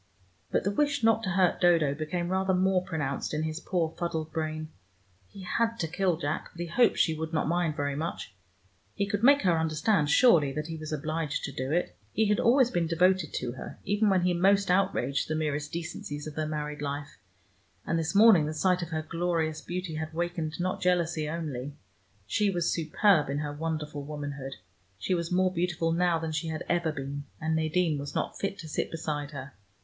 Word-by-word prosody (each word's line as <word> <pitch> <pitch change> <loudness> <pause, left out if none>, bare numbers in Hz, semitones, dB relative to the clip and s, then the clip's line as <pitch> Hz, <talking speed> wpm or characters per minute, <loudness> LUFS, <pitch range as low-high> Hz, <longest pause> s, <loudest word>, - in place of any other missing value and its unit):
But - - +1
the 200 - +1
wish 285 +4 +1
not 225 0 +4
to 195 - -2
hurt 185 -1 +2
Dodo 165 -5 +4
became 165 +4 -3
rather 190 0 +1
more 185 0 +3
pronounced 150 -4 -3
in 155 - -1
his 155 +1 -3
poor 170 -3 -1
fuddled 160 -2 -2
brain. 155 -1 -3 0.6
He 195 - -11
had 230 +5 0
to 165 - -1
kill 180 0 0
Jack, 155 -1 -3
but 170 - -15
he - - -1
hoped 230 +8 +3
she 160 - +3
would 160 +1 -4
not 155 - +1
mind 170 -2 +1
very 145 -2 -1
much: 155 - -4 0.6
he 200 - 0
could 205 0 -2
make 280 +2 +6
her 170 -3 +3
understand 160 +1 +1
surely 160 - +5
that 150 +1 -3
he 165 0 -5
was 155 -1 -7
obliged 155 0 -2
to 140 - -3
do 130 +1 -4
it. 165 - 0 0.2
He 220 - +2
had 210 - +3
always 250 +1 +4
been 170 -2 0
devoted 180 0 +2
to 120 - -2
her, 125 - -8
even 205 +2 +2
when 185 -2 +3
he 180 0 +2
most 195 +2 +3
outraged 180 -8 +1
the 155 - -1
merest 150 -1 -2
decencies 160 -3 -5
of 155 - -6
their 155 +1 -2
married 150 -1 -4
life, 145 0 -5 0.7
and 165 - 0
this 165 +4 -2
morning 200 -7 +7
the 155 - -4
sight 180 +2 +2
of 170 - -4
her 155 -2 -2
glorious 165 -1 -1
beauty 180 -1 -4
had 155 0 -5
wakened 170 -2 -2
not 185 +1 -1
jealousy 170 -4 +1
only. 145 -4 -4 0.5
She 200 - +1
was 175 -3 0
superb 160 -1 +3
in 140 - -1
her 145 0 -3
wonderful 150 -1 -3
womanhood: 140 -2 -6 0.4
she 185 - -1
was 170 -1 -1
more 185 +1 +2
beautiful 170 -1 0
now 175 0 +2
than 160 0 -3
she 155 +1 -2
had 160 -1 -3
ever 170 -2 +1
been, 140 0 -5
and 160 0 0
Nadine 160 -1 +1
was 140 0 -6
not - - -2
fit 195 0 -2
to 165 - -8
sit 155 - -2
beside 150 -3 -3
her. 140 -2 -8
165 Hz, 205 wpm, -28 LUFS, 150-180 Hz, 0.7 s, morning